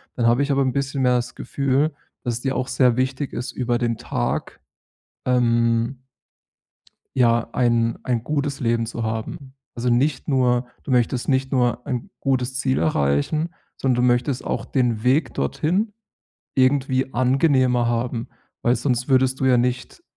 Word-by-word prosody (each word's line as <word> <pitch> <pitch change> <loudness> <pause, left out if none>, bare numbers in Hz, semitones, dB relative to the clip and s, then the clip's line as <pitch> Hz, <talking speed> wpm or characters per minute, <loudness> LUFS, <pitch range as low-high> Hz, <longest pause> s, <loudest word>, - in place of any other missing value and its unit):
dann 120 - 0
habe 120 +3 +3
ich 140 - -1
aber 140 0 +2
‘n 130 -2 0
bisschen 140 0 -2
mehr 125 -1 +4
das 125 0 -2
Gefühl, 140 +2 0 0.3
dass 120 -1 -1
es 120 - -5
dir 135 0 -1
auch 130 - -1
sehr 125 -4 +3
wichtig 130 +2 -1
ist, 120 - -4
über 120 -1 -1
den 120 -2 -1
Tag, - - -3 0.7
ähm 120 0 +2 1.2
ja, 120 -2 +3
ein 115 -2 +2
ein 120 -3 -1
gutes 140 0 -2
Leben 115 -1 +1
zu 115 0 -5
haben. 115 +6 -5 0.2
Also, 120 +1 -1
nicht 130 +6 +1
nur 125 -3 +2 0.2
du 140 - -5
möchtest 125 0 +1
nicht 135 -1 +1
nur 125 -2 +1
ein 125 -3 -3
gutes 130 -1 0
Ziel 130 0 0
erreichen, 80 - 0 0.2
sondern 125 -2 +1
du - - +4
möchtest 125 +2 +1
auch - - -2
den 120 -5 0
Weg 135 +4 +2
dorthin 185 - -1 0.6
irgendwie 130 0 +2
angenehmer 130 -1 +2
haben, 120 0 -2 0.3
weil 120 +1 +3
sonst 125 -2 -1
würdest 130 0 +2
du - - +1
ja 130 -2 +5
nicht 125 - -2
125 Hz, 160 wpm, -22 LUFS, 120-135 Hz, 1.2 s, ja